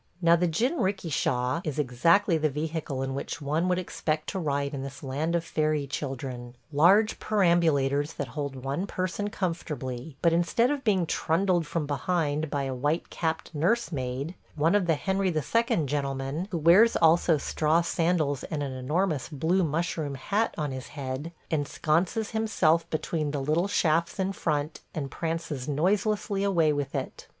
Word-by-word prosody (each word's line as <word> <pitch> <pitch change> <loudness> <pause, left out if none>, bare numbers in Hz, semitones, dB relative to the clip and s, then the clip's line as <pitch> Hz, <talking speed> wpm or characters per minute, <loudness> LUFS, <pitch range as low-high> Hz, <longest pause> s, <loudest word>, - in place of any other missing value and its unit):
Now, 170 -1 +5
the 175 +1 +1
jinrikisha 165 - 0
is 155 -4 -3
exactly 165 +8 +3
the 155 -1 +1
vehicle 150 -2 -3
in 135 0 -3
which 140 - -4
one 155 +4 0
would 180 -1 +2
expect 155 -4 -2
to 190 - -3
ride 140 -3 -1
in 135 - -3
this 135 0 -8
land 145 +5 -1
of 170 -1 -1
fairy 155 -2 0
children 130 -3 -5
– - - -38
large 195 +9 +4
perambulators 165 -7 +2
that 140 -3 -4
hold 140 +2 -4
one 135 +8 -3
person 185 +3 -2
comfortably; 150 -8 -4
but 170 -1 +4
instead 175 +9 +2
of 285 -2 -2
being 195 -6 +2
trundled 170 +1 +1
from 165 -1 -2
behind 150 +1 -1
by 145 -1 -1
a 135 -1 -2
white 145 +6 -1
capped 160 0 -2
nursemaid, 150 - -1 0.2
one 155 +4 +2
of 205 -4 +2
the 165 - +3
Henry 190 +5 0
II. 170 - +1
gentlemen, 140 +3 -2
who 175 - -2
wears 175 +9 +6
also 165 0 +4
straw 155 +3 +1
sandals 165 -5 0
and 150 -2 -3
an 140 - -3
enormous 150 +4 -1
blue 165 +5 +1
mushroom 155 -2 -1
hat 205 - -1
on 150 -3 -2
his 130 0 -6
head, 140 +2 -5 0.2
ensconces 165 +7 0
himself 185 -7 +2
between 155 -1 -2
the 145 0 -2
little 155 +7 +1
shafts 165 -3 +1
in 190 +1 0
front 150 -3 -2 0.2
and 140 -3 -3
prances 165 -5 -3
noiselessly 195 +6 +1
away 170 -6 +3
with 145 0 -3
it. 135 - -5
160 Hz, 160 wpm, -27 LUFS, 140-175 Hz, 0.2 s, wears